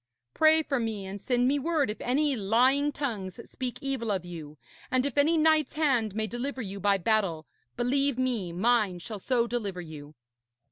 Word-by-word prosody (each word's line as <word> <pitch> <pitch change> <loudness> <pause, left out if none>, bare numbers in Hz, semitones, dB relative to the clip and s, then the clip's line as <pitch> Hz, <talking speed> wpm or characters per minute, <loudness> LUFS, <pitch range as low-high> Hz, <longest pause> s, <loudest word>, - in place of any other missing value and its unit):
Pray 315 0 +5
for 275 -3 -1
me, 220 -4 -3
and 195 +1 -7
send 245 -1 +1
me 285 +2 +2
word 295 -5 0
if 210 - -9
any 280 +3 +1
lying 255 +7 +3
tongues 220 -10 -4
speak 255 -2 -5
evil 265 -5 -2
of 185 -3 -2
you, 155 -4 -9 0.3
and 255 +1 +1
if 280 - -2
any 310 +3 +4
knight's 315 -1 +3
hand 255 -10 +1
may 220 0 0
deliver 250 +5 -4
you 200 -1 -6
by 200 0 +3
battle, 190 -5 0 0.3
believe 275 +2 +1
me 240 -9 -1
mine 210 0 +2
shall 210 +4 -7
so 240 +3 +1
deliver 215 -6 -3
you.' 155 -3 -9
240 Hz, 180 wpm, -28 LUFS, 195-275 Hz, 0.3 s, Pray